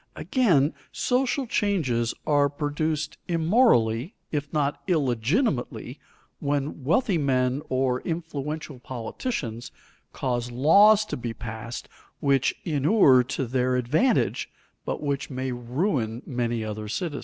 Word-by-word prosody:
Again, 170 - +2 0.2
social 260 +2 0
changes 155 - 0
are 145 -1 +3
produced 150 +2 -2
immorally, 165 - +2 0.2
if 145 -1 -3
not 145 -2 0
illegitimately, 145 - 0 0.4
when 145 0 -2
wealthy 170 - +2
men 130 -1 +1
or 130 -1 +1
influential 155 -4 -4
politicians 120 - -5 0.4
cause 120 -2 -2
laws 200 - +6
to - - -4
be 120 -2 -5
passed 115 +1 -6 0.3
which 135 -2 +2
inure 145 - +4
to 135 +1 -2
their 125 +1 0
advantage 145 - +1 0.4
but - - -3
which 140 -1 -2
may 130 -1 -3
ruin 120 - -2
many 120 -3 -2
other 105 0 -5
citizens. 145 - -3
140 Hz, 110 wpm, -26 LUFS, 125-160 Hz, 0.4 s, laws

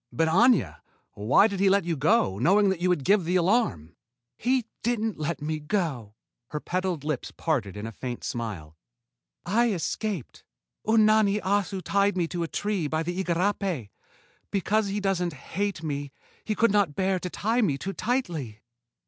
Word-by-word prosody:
"But, 165 0 +1
Aña! 175 - +3 0.3
Why 105 - +4
did 200 -3 -1
he 195 0 +4
let 200 0 +3
you 170 -1 0
go, 145 - +2
knowing 195 - +4
that 190 -3 -2
you 180 - +2
would 175 -6 +1
give 200 +4 +4
the 175 +3 -1
alarm?" 170 - +1 0.4
"He 250 - +1 0.2
didn't 225 -4 -1
let 155 0 -3
me 155 0 -2
go." 150 - -2 0.3
Her 150 - -4
petaled 180 -2 -2
lips 150 -4 -3
parted 120 - -2
in 105 - -5
a 115 - -5
faint 120 +2 -6
smile. 100 -10 -5 0.7
"I 230 +5 +2
escaped. 195 - -3 0.4
Unani 215 -2 +4
Assu 195 -1 0
tied 200 -1 +1
me 170 -2 +1
to 175 - -3
a 165 - -1
tree 205 -3 -1
by 155 +2 -1
the 175 +3 -2
igarapé. 180 - -1 0.6
Because 205 +2 +1
he 200 +1 -2
doesn't... 185 -4 0
hate 195 +5 -4
me, 145 -2 -3 0.3
he 215 - -1
could 230 0 +3
not 200 -8 +2
bear 190 -1 +1
to 180 - -4
tie 225 +7 0
me 155 -11 +1
too 195 +8 -4
tightly." 165 - -2
180 Hz, 170 wpm, -26 LUFS, 150-205 Hz, 0.7 s, Why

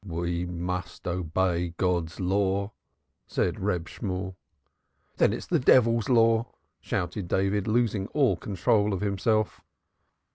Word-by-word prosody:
"We 85 -1 -3
must 90 0 -5
obey 85 0 -1
God's 90 -2 -1
law," 100 +2 0 0.6
said - - -1
Reb 85 -1 -1
Shemuel. 95 -3 -4 0.8
"Then - - +4
it - - -1
is - - -9
the 170 - +1
devil's 115 -3 +4
law!" 115 -1 +4 0.3
shouted 90 +1 -3
David, 95 +2 0
losing 110 -3 +1
all 135 -10 +2
control 100 +3 +1
of 95 - -5
himself. 105 +2 0
95 Hz, 120 wpm, -27 LUFS, 90-110 Hz, 0.8 s, Then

